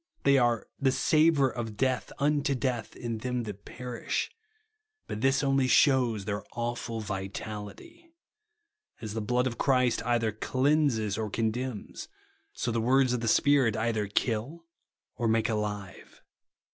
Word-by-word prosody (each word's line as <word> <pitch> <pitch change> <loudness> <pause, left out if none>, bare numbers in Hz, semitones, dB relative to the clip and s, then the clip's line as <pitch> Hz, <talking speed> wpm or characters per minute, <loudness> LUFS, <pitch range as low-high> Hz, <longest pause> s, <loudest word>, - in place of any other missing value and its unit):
They 140 -1 +5
are 120 -2 +1
"the 135 -2 +3
savour 155 0 +4
of 115 -3 -5
death 130 +1 0
unto 145 -1 +1
death 125 -3 -2
in 115 -2 -4
them 125 +1 -2
that 100 -2 -8
perish 125 -1 -4 0.4
;" 435 0 -52
but 105 - -5
this 135 +2 +2
only 135 -1 +2
shevv's 125 -7 +3
their 105 0 -3
awful 120 -1 -3
vitality. 105 - -7 0.9
As 110 -3 -6
the 110 - -2
blood 125 +4 +1
of 120 -3 -3
Christ 125 -3 +2
either 115 -2 +1
cleanses 130 -3 +1
or 110 -1 -2
condemns, 115 +2 -3 0.4
so 120 - -3
the 115 0 0
words 130 +2 +3
of 125 - 0
the 115 - -2
Spirit 130 -2 +3
either 110 -2 0
kill 120 +10 -2 0.5
or 120 - 0
make 110 0 +2
alive. 105 -3 -5
120 Hz, 145 wpm, -29 LUFS, 110-135 Hz, 0.9 s, They